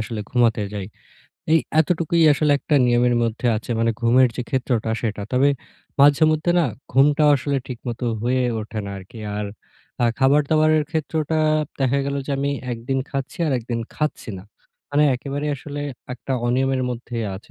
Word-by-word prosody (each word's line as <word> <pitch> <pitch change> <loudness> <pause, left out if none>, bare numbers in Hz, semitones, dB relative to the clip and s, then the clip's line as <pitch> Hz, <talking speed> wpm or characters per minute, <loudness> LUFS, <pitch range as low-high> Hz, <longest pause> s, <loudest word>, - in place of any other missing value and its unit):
আসলে 110 0 -4
ঘুমাতে 115 -4 +2
যাই। 100 -2 -4 0.7
এই 165 - +7 0.2
এতটুকুই 170 0 +1
আসলে 145 0 +2
একটা 150 - -1
নিয়মের 120 0 +3
মধ্যে 115 +1 -1
আছে। 115 - -7
মানে 115 0 +2
ঘুমের 125 +2 +5
যে, 125 - -2
ক্ষেত্রটা 120 -4 0
সেটা। 105 -3 -2
তবে 130 +3 +4 0.5
মাঝেমধ্যে 155 +3 +4
না 170 - +3 0.3
ঘুমটা 145 +4 +4
আসলে 140 0 -1
ঠিকমতো 125 -1 -5 0.2
হয়ে 130 +2 +1 0.2
ওঠে 110 0 -6
না 100 - -5
আর 95 - -9
কি। 115 - -11 0.2
আর 105 0 -2 0.6
আ - - +5
খাবার-দাবারের 150 +3 +3
ক্ষেত্রটা 160 -1 -1 0.4
দেখা 135 +1 +2
গেল 140 - -2
যে, - - -5
আমি 140 +1 0 0.2
১ 115 - -5
দিন 135 0 +1
খাচ্ছি 135 -1 -4
আর 145 - +1
১ - - -8
দিন 115 -1 -1
খাচ্ছি 150 -6 -3
না। - - -10 0.5
মানে 145 +1 +3
একেবারে 140 +4 -4
আসলে 145 +2 -7 0.3
একটা 130 +2 -5
অনিয়মের 130 +1 +1
মধ্যে 120 0 -6 0.2
আছে। 95 - -12
135 Hz, 170 wpm, -22 LUFS, 120-145 Hz, 0.7 s, এই